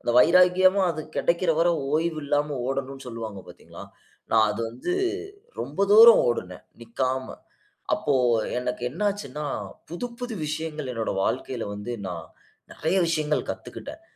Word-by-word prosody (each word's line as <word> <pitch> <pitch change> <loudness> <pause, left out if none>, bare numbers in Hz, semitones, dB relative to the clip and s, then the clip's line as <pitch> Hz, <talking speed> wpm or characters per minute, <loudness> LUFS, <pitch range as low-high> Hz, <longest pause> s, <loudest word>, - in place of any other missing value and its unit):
அந்த 120 - 0
வைராக்கியமா 185 +5 +5
அது 160 - -4 0.2
கெடைக்கற 170 +1 +1
வர 175 - +4 0.3
ஓய்வு 160 0 0
இல்லாம 145 0 0
ஓடணும்னு 135 0 -4
சொல்வாங்க 110 -4 -6
பாத்தீங்களா? - - -12 0.5
நான் 110 -1 +5
அது 105 +2 -4
வந்து 125 - -4 0.7
ரொம்ப - - -5
தூரம் 230 +2 +9
ஓடுனே 90 -6 -2 0.2
நிக்காம. 130 +3 -2 0.7
அப்போ 145 - 0 0.5
எனக்கு 125 0 -4
என்ன 160 +10 -9
ஆச்சுன்னா? 150 -7 -6 0.4
புது 175 +9 -4
புது 245 -2 -4
விஷயங்கள் 155 -3 -4
என்னோட 115 -1 -2
வாழ்க்கையில 125 -2 -2
வந்து 105 +4 -6 0.2
நான் 85 -2 -6 0.5
நெறய 170 +5 -1
விஷயங்கள் 155 -2 0
கத்துக்கிட்டேன். 310 +3 -9
150 Hz, 130 wpm, -25 LUFS, 120-170 Hz, 0.7 s, தூரம்